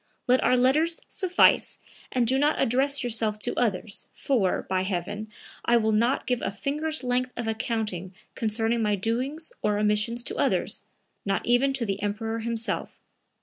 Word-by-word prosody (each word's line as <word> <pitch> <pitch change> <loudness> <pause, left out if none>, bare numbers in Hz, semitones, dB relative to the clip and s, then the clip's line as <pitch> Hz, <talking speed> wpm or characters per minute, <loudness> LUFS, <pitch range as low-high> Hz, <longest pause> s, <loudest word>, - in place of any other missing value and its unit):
Let 255 0 +3
our 255 - +4
letters 305 +7 +2
suffice 365 -2 +3 0.3
and 250 -2 +2
do 260 +3 +2
not 295 +2 +2
address 275 +4 +2
yourself 225 -3 0
to 225 +3 -2
others, 210 -3 -1
for, 225 -9 0
by 185 -1 +1
heaven, 200 +3 -3 0.3
I 235 - +4
will 220 -1 +2
not 235 +5 +2
give 250 -2 0
a - - -1
finger's 300 +8 -2
length 250 0 0
of 235 -1 -3
accounting 215 -5 -2 0.2
concerning 225 +1 0
my 210 -1 +2
doings 255 - -2
or 210 -1 +1
omissions 210 +3 +1
to - - -2
others, - - 0 0.4
not 195 -1 -1
even 245 +3 +3
to 260 -3 -1
the 200 -1 -3
Emperor 225 +2 -2
himself. 230 0 -3
230 Hz, 160 wpm, -26 LUFS, 210-255 Hz, 0.4 s, our